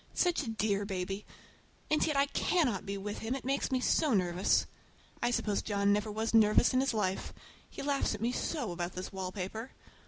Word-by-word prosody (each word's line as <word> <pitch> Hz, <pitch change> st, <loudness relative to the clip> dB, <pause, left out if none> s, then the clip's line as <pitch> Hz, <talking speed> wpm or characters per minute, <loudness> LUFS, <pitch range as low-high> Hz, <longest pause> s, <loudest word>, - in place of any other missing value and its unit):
Such 355 Hz, -3 st, +2 dB
a 255 Hz, -, -4 dB
dear 210 Hz, -2 st, 0 dB
baby! 195 Hz, 0 st, -4 dB, 0.6 s
And 305 Hz, -, +3 dB
yet 300 Hz, -3 st, 0 dB
I 280 Hz, -, +5 dB
cannot 280 Hz, -, 0 dB
be 200 Hz, 0 st, -2 dB
with 205 Hz, +1 st, -5 dB
him, 225 Hz, +4 st, -2 dB
it 270 Hz, -, -7 dB
makes 275 Hz, +1 st, 0 dB
me 260 Hz, -, +2 dB
so 265 Hz, 0 st, +2 dB
nervous. 180 Hz, 0 st, +2 dB, 0.6 s
I 240 Hz, -, +2 dB
suppose 210 Hz, -4 st, 0 dB
John 200 Hz, -1 st, +2 dB
never 210 Hz, +1 st, 0 dB
was 220 Hz, +2 st, -2 dB
nervous 220 Hz, +2 st, +5 dB
in 255 Hz, -, +4 dB
his 265 Hz, -3 st, +1 dB
life. 190 Hz, -3 st, -1 dB, 0.4 s
He -, -, -7 dB
laughs 280 Hz, -5 st, +1 dB
at 210 Hz, -, -9 dB
me 235 Hz, +2 st, +1 dB
so 255 Hz, -, -2 dB
about 175 Hz, 0 st, -3 dB
this 185 Hz, 0 st, -5 dB
wallpaper! 190 Hz, +5 st, -5 dB
215 Hz, 195 wpm, -32 LUFS, 195-260 Hz, 0.6 s, I